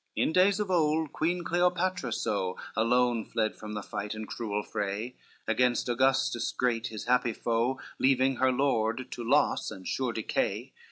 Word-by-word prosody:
CXVIII - - +3
In - - -2
days 190 +3 +4
of 205 -3 -1
old, 155 -3 +1
Queen 175 +2 0
Cleopatra 175 -5 0
so 95 -4 -1 0.2
Alone 120 0 +2
fled 110 -1 -1
from 105 0 -8
the 105 -1 -4
fight 105 +2 -5
and 110 0 -6
cruel 105 +1 -3
fray, 105 +5 -3 0.3
Against 125 -1 +2
Augustus 125 -1 +1
great 115 -2 0
his 110 -2 -6
happy 125 -1 +2
foe, 120 +4 0 0.2
Leaving 130 0 +3
her 130 0 +3
lord 125 -2 0
to 120 - -5
loss 115 - +2
and 95 -1 -9
sure 130 -2 -1
decay. 110 -2 -2
125 Hz, 165 wpm, -29 LUFS, 110-135 Hz, 0.3 s, days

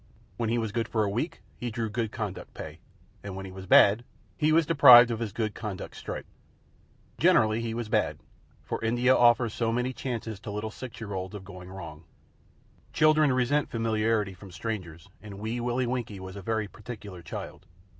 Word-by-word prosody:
When 115 -2 -1
he 120 - +1
was 110 -2 -1
good 115 0 -1
for 110 -2 0
a 100 - 0
week, 155 - -3
he 120 - -3
drew 115 0 -2
good 110 0 -2
conduct 105 -5 -6
pay; - - -8 0.4
and 100 -2 -6
when 95 0 -6
he 95 - -8
was 95 0 -9
bad, 105 +6 +6 0.3
he 155 0 +2
was 165 0 +4
deprived 125 -6 +9
of 115 - -2
his 115 -3 -3
good 110 0 -2
conduct 105 -4 -6
stripe. - - -6 0.9
Generally 110 +1 +4
he 115 -1 -3
was 120 -2 -3
bad, - - +1 0.5
for - - -4
India 120 +3 +3
offers 120 -2 +4
so 115 -1 0
many 125 +2 -1
chances 115 -5 -4
to 110 - -8
little 105 +1 -4
six 120 0 -9
year 105 -3 -6
olds 95 +1 -4
of 95 -2 -8
going 90 -2 -10
wrong. 80 -5 -9 0.9
Children 155 -2 +4
resent 130 +4 +1
familiarity 110 -2 0
from 95 +2 -13
strangers, 90 -3 -6
and 105 -2 -9
Wee 110 +4 -3
Willie 120 +1 0
Winkie 120 -5 -3
was 95 0 -8
a 100 - -7
very 110 +1 -1
particular 100 -4 -9
child. - - -8
110 Hz, 190 wpm, -28 LUFS, 100-120 Hz, 0.9 s, deprived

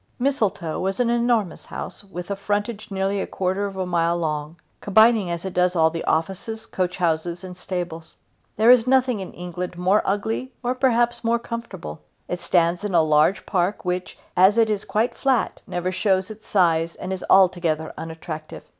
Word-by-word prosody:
Mistletoe 215 - -1
is 195 +3 -2
an 240 -1 +2
enormous 235 -5 0
house - - -7
with 185 -1 -7
a - - 0
frontage 205 +2 -3
nearly 195 0 -1
a - - -3
quarter 190 +2 -1
of 195 -1 -8
a 185 - -1
mile 170 -1 +1
long, 155 -1 -3 0.2
combining 220 -1 +4
as 170 +1 -4
it 190 - -4
does 180 0 +2
all 160 -1 +4
the 165 - -4
offices, 195 +7 -2
coach 180 -4 -2
houses, 170 0 -1
and 185 -1 -8
stables. 175 -3 -6 0.4
There 225 +3 +6
is 250 -1 +5
nothing 255 -3 +3
in 190 - -6
England 180 0 -6
more 185 +4 +3
ugly 220 +6 -2
or 245 +1 +1
perhaps 240 -2 +1
more 230 +1 +2
comfortable. 230 - -7 0.3
It 180 - -3
stands 175 +1 +1
in 205 -3 -1
a 165 -2 +5 0.2
huge 190 - -5
park 185 +1 -1
which, 180 0 -3 0.2
as 190 +4 +5
it 225 -2 +4
is 210 -1 -2
quite 225 +3 0
flat, 265 -4 0
never 180 +1 -2
shows 190 +1 +1
its 215 0 -12
size 170 -3 +2
and 185 +1 -5
is 185 - -5
altogether 175 -4 +3
unattractive. 160 -1 -7
190 Hz, 180 wpm, -23 LUFS, 175-220 Hz, 0.4 s, There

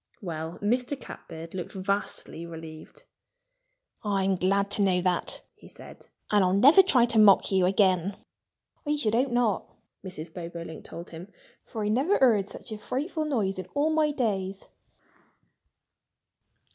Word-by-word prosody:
Well, 165 -3 -5
Mr. 250 +5 0
Catbird 165 -7 -10
looked 185 0 -6
vastly 195 -3 -3
relieved. 160 -1 -11 1.0
"I'm 195 -2 +1
glad 200 +2 +1
to 205 - +4
know 185 -2 +3
that," 180 -1 0
he - - -17
said. - - -13 0.2
"And 205 -2 +4
I'll 185 0 +2
never 285 - +8
try 265 -11 +3
to 230 -2 +1
mock 205 -2 +6
you 190 -2 +3
again." 190 -1 +2 0.7
"I 295 -2 0
should 225 -8 0
hope 255 +4 +2
not!" 240 -4 0 0.4
Mrs. 170 -4 -8
Bobolink 170 -2 -8
told 170 +1 -9
him. 170 +4 -10 0.4
"For 220 - -5
I - - 0
never 275 - +2
heard 215 -7 +3
such - - -9
a 215 - -5
frightful 310 - -3
noise 210 -10 -1
in 185 - -6
all 295 +2 +2
my 315 -1 +2
days." 200 -8 -2
200 Hz, 145 wpm, -27 LUFS, 180-245 Hz, 1.0 s, never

